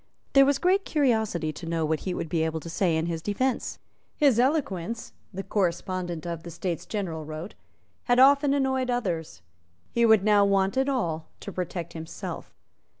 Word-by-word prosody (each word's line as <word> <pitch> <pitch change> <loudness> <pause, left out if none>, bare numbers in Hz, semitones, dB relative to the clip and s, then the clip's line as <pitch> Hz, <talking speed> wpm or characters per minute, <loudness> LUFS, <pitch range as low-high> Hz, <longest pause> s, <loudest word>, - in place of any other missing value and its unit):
There 275 -1 +7
was 280 -1 +3
great 375 +4 +2
curiosity 220 - +1
to 165 - -8
know 165 -1 0
what 155 0 0
he 185 -2 -3
would - - -3
be 160 +1 0
able 160 0 -1
to 165 - -7
say 170 -2 +1
in 160 - 0
his 165 -1 -3
defence. 245 +8 -1 0.4
His 275 -6 +4
eloquence, 235 - -1 0.2
the 195 0 -5
correspondent 175 -3 -2
of 170 -1 -4
the 170 - -9
States 170 0 -4
General 175 -7 -3
wrote, 155 +5 -7 0.5
had 245 -1 +3
often 280 +2 +6
annoyed 265 -2 0
others. 180 - -2 0.5
He 235 0 +3
would 220 -3 +5
now 210 -1 +5
want 195 +1 +2
it 265 +1 +2
all 165 - -1
to 200 - -6
protect 175 -2 -4
himself. 160 -1 -7
190 Hz, 175 wpm, -26 LUFS, 165-250 Hz, 0.5 s, There